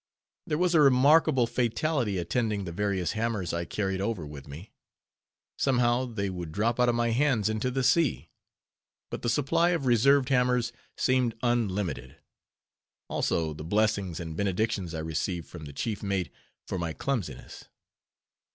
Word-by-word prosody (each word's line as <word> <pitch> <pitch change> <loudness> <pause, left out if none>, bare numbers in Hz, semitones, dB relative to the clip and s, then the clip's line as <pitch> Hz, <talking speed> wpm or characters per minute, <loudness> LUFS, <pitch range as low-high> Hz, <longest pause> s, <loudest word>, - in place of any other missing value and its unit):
There 150 - 0
was 180 +1 +2
a 160 - +6
remarkable 140 0 +5
fatality 120 -1 0
attending 105 +3 -1
the 85 - -5
various 95 -1 -1
hammers 110 -5 -2
I 85 0 -2
carried 95 0 -2
over 100 -6 -2
with 75 -1 -10
me. 80 +9 -10 0.9
Somehow 125 -1 +2
they 110 -5 -3
would 90 -4 -5
drop 110 +7 0
out 125 0 +4
of 120 - +1
my 120 0 +1
hands 120 -4 +2
into 110 +3 -1
the 130 +1 -1
sea. 145 +3 +2 0.8
But - - -5
the 120 - -1
supply 165 +7 +2
of 140 - -7
reserved 130 +3 +4
hammers 125 -2 +2 0.2
seemed 130 -3 +1
unlimited: 100 - -1 0.9
also 80 -2 0
the 75 - -8
blessings 100 -1 0
and 80 -2 -6
benedictions 95 -2 -1
I 80 - -3
received 80 +2 -3
from 80 -3 -9
the 70 - -8
chief 105 +8 -3
mate 95 -7 -2 0.4
for 95 - -3
my 85 -2 -2
clumsiness. 85 - -4
110 Hz, 150 wpm, -28 LUFS, 90-125 Hz, 0.9 s, a